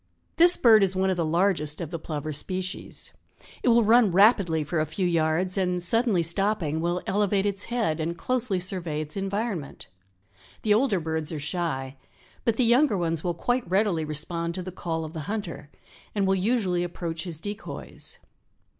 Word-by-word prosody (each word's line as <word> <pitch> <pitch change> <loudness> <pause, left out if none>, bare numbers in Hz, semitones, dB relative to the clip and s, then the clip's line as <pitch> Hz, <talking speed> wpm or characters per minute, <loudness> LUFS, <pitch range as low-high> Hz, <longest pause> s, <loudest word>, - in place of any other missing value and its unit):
This 345 +1 +7
bird 225 -3 +6
is 190 -1 +2
one 190 0 +2
of - - 0
the 170 - +1
largest 160 -2 +1
of 170 -3 -5
the 170 - -4
plover 155 -1 -4
species. 185 +5 -4 0.5
It - - -2
will 235 0 +5
run 225 -1 +5
rapidly 190 -5 +4
for 155 +2 -2
a 155 - +1
few 185 +5 -2
yards 170 +3 +1
and 180 -1 0
suddenly 205 0 +2
stopping 170 -3 0
will 175 +1 -1
elevate 200 0 +1
its 200 -1 -1
head 225 -10 -1
and 165 +2 -2
closely 250 -4 -1
survey 175 -4 -3
its 155 0 -7
environment. 195 -5 -4 0.7
The 210 - +4
older 220 -3 +2
birds 160 -1 -3
are 155 - -4
shy, 140 -4 -3 0.5
but 230 -3 +2
the 250 - +2
younger 240 -1 +4
ones 165 -2 -1
will 175 -1 -1
quite 245 +3 -1
readily 190 -4 +2
respond 165 +3 -3
to 185 - -4
the 185 - -6
call 165 -2 -3
of 155 - -9
the 160 - -5
hunter 170 -9 -5 0.5
and 200 -2 +1
will 190 - +3
usually 190 -3 +1
approach 170 -1 -4
his 165 -4 -6
decoys. 205 +4 -7
180 Hz, 180 wpm, -26 LUFS, 160-205 Hz, 0.7 s, This